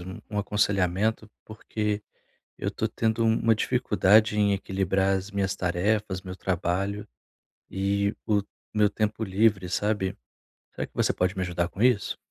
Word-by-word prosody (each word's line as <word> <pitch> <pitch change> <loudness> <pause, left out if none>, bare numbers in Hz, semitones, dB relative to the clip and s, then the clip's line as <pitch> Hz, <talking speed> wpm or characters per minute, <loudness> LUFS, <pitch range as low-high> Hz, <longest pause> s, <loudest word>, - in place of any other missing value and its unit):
um 90 +1 -8
um 105 - -2
aconselhamento, 100 +1 0
porque 105 -1 -3 0.6
eu - - -2
tô - - -2
tendo 115 0 0
uma 115 0 +3
dificuldade 105 +1 +3
em 100 -1 +3
equilibrar 95 0 0
as 95 +2 -8
minhas 100 -1 -1
tarefas, 95 +2 0
meu 90 -1 -7
trabalho 95 +3 -2 0.6
e 100 +1 0
o 105 -3 +2 0.3
meu 105 -1 +4
tempo 110 +1 -1
livre, 95 -1 +2
sabe? 100 0 -1 0.6
Será - - -3
que - - -33
você - - +2
pode 90 +1 0
me 95 - -1
ajudar 85 -1 -1
com 100 - -5
isso? 125 -4 +2
100 Hz, 145 wpm, -26 LUFS, 95-105 Hz, 0.6 s, meu